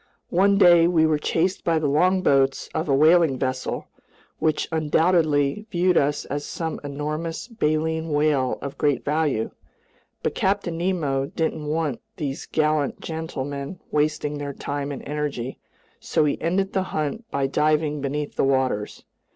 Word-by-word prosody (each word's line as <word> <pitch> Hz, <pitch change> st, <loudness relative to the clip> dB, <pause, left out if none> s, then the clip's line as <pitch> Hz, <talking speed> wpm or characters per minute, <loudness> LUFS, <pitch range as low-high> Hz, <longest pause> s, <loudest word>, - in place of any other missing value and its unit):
One 195 Hz, +3 st, +4 dB
day 175 Hz, -3 st, +7 dB
we 165 Hz, -2 st, +3 dB
were 155 Hz, -1 st, +2 dB
chased 180 Hz, +5 st, 0 dB
by 165 Hz, -1 st, +2 dB
the 155 Hz, -, -1 dB
longboats 145 Hz, -3 st, +2 dB
of 160 Hz, -, -2 dB
a 135 Hz, -, +4 dB
whaling 155 Hz, -1 st, +5 dB
vessel, 130 Hz, 0 st, -2 dB, 0.5 s
which 155 Hz, -1 st, +1 dB
undoubtedly 160 Hz, +2 st, +2 dB
viewed 180 Hz, -2 st, +2 dB
us 145 Hz, 0 st, +1 dB
as 145 Hz, +1 st, -3 dB
some 160 Hz, 0 st, -4 dB
enormous 155 Hz, +5 st, -4 dB
baleen 160 Hz, -6 st, -1 dB
whale 145 Hz, -3 st, +1 dB
of 140 Hz, -1 st, -6 dB
great 145 Hz, -3 st, +1 dB
value. 145 Hz, -6 st, 0 dB, 0.7 s
But -, -, 0 dB
Captain 190 Hz, -3 st, 0 dB
Nemo 150 Hz, -7 st, 0 dB
didn't 160 Hz, 0 st, -2 dB
want 150 Hz, -4 st, -1 dB, 0.2 s
these 140 Hz, -3 st, -4 dB
gallant 155 Hz, -2 st, 0 dB
gentlemen 145 Hz, -1 st, -5 dB
wasting 150 Hz, -1 st, 0 dB
their 140 Hz, -1 st, -4 dB
time 145 Hz, +1 st, -4 dB
and 140 Hz, -, -6 dB
energy, 145 Hz, -4 st, -3 dB, 0.4 s
so 155 Hz, -, +1 dB
he 145 Hz, -, -1 dB
ended 190 Hz, +4 st, 0 dB
the 190 Hz, -, +1 dB, 0.2 s
hunt 155 Hz, +10 st, -3 dB
by 140 Hz, -1 st, 0 dB
diving 150 Hz, +1 st, +1 dB
beneath 145 Hz, +1 st, -3 dB
the -, -, +2 dB
waters. 130 Hz, -6 st, 0 dB
150 Hz, 145 wpm, -24 LUFS, 140-165 Hz, 0.7 s, day